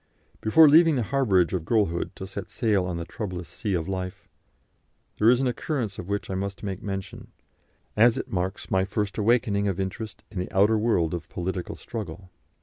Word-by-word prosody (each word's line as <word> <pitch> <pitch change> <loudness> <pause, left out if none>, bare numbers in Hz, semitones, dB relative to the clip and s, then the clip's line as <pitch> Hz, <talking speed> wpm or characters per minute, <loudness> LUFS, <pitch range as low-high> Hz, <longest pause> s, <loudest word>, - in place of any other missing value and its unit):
Before 155 +9 +7
leaving 160 +1 +6
the 125 - +1
harbourage 100 -9 +2
of 90 -4 -1
girlhood 95 -2 0
to 95 - -6
set 95 0 -7
sail 105 -6 +1
on 90 -2 -3
the 85 - -4
troublous 90 -5 -5
sea 95 +5 -3
of 80 -2 -2
life, 95 +1 -5 0.9
there 110 - +6
is 125 0 +5
an 135 - +1
occurrence 120 -4 -2
of 90 - -7
which 100 0 -2
I - - -1
must 100 +1 -4
make 95 0 -4
mention, 95 -3 -6 0.7
as 115 +2 +5
it - - -5
marks 95 +1 -3
my 95 0 +3
first 100 +2 -2
awakening 105 -2 +2
of 95 -1 -1
interest 95 +3 -5
in 100 - -4
the 90 - -4
outer 105 +3 +4
world 90 -8 +1
of 85 -2 -5
political 90 0 -4
struggle. 95 -4 -7
100 Hz, 190 wpm, -26 LUFS, 90-110 Hz, 0.9 s, Before